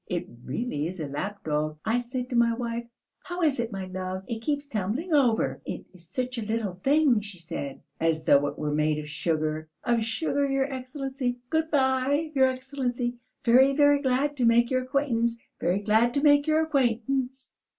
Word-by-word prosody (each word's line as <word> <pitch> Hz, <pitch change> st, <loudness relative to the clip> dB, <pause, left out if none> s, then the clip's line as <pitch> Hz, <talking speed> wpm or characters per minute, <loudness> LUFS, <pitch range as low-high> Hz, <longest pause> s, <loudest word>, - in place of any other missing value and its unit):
It 175 Hz, -1 st, -2 dB, 0.2 s
really 150 Hz, -, -2 dB
is 185 Hz, +1 st, -7 dB
a 155 Hz, -, -2 dB
lapdog! 155 Hz, -1 st, -3 dB
I 235 Hz, +3 st, +2 dB
said 250 Hz, +1 st, -4 dB
to -, -, -1 dB
my 235 Hz, -1 st, +4 dB
wife: 235 Hz, 0 st, -4 dB, 0.3 s
'How 355 Hz, 0 st, -4 dB
is 290 Hz, -5 st, +2 dB
it, 235 Hz, -1 st, -1 dB
my 195 Hz, -2 st, -4 dB
love, 185 Hz, 0 st, -5 dB
it 230 Hz, -2 st, -4 dB
keeps 285 Hz, +3 st, -1 dB
tumbling 240 Hz, -, -2 dB
over?' 250 Hz, -7 st, +2 dB
'It -, -, -6 dB
is 170 Hz, -2 st, -18 dB
such 250 Hz, +3 st, -2 dB
a -, -, -3 dB
little 220 Hz, -2 st, -2 dB
thing,' 280 Hz, -5 st, +4 dB
she 205 Hz, -2 st, -9 dB
said. 165 Hz, -5 st, -6 dB, 0.2 s
As 160 Hz, -1 st, +1 dB
though 145 Hz, -1 st, +5 dB
it -, -, -5 dB
were 150 Hz, -1 st, -2 dB
made 150 Hz, 0 st, +1 dB
of 150 Hz, 0 st, -5 dB
sugar, 155 Hz, 0 st, -2 dB
of 235 Hz, -2 st, +2 dB
sugar, 280 Hz, +5 st, 0 dB
your 270 Hz, 0 st, +2 dB
Excellency! 265 Hz, -1 st, -4 dB
Good 320 Hz, 0 st, +1 dB
bye, 275 Hz, +2 st, +2 dB
your 265 Hz, -2 st, +5 dB
Excellency, 255 Hz, -2 st, -3 dB, 0.3 s
very, 260 Hz, +3 st, +6 dB
very 290 Hz, -1 st, +5 dB
glad 275 Hz, +2 st, +1 dB
to 250 Hz, -, +2 dB
make 235 Hz, +1 st, +4 dB
your 255 Hz, 0 st, +2 dB
acquaintance, 240 Hz, -3 st, 0 dB, 0.2 s
very 185 Hz, +3 st, +1 dB
glad 225 Hz, +4 st, +3 dB
to 280 Hz, -, +2 dB
make 290 Hz, 0 st, +5 dB
your 310 Hz, 0 st, +3 dB
acquaintance!" 265 Hz, -2 st, -1 dB
240 Hz, 185 wpm, -27 LUFS, 190-270 Hz, 0.3 s, very